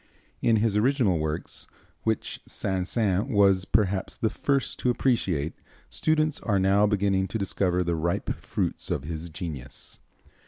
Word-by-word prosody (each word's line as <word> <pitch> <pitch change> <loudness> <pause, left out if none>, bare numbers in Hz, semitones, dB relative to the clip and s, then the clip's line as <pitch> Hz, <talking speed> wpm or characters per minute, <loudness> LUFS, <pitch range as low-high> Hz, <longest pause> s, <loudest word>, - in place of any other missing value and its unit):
In 115 - +4
his 110 -1 +2
original 110 - +2
works, 75 +1 -3 0.4
which 110 -2 -1
Saint 95 -1 -2
Saëns 100 -1 +1
was 100 -6 +4
perhaps 100 -3 0
the 110 - 0
first 140 +1 -1
to 125 - +1
appreciate, 95 - +1 0.4
students 155 -1 +1
are 105 -4 0
now 100 +2 +4
beginning 100 -2 +1
to 110 - -3
discover 90 -3 0
the 85 -1 0
ripe 85 +2 -1
fruits - - -1
of - - -1
his 80 +2 -5
genius. 75 -6 -7
95 Hz, 145 wpm, -26 LUFS, 85-110 Hz, 0.4 s, In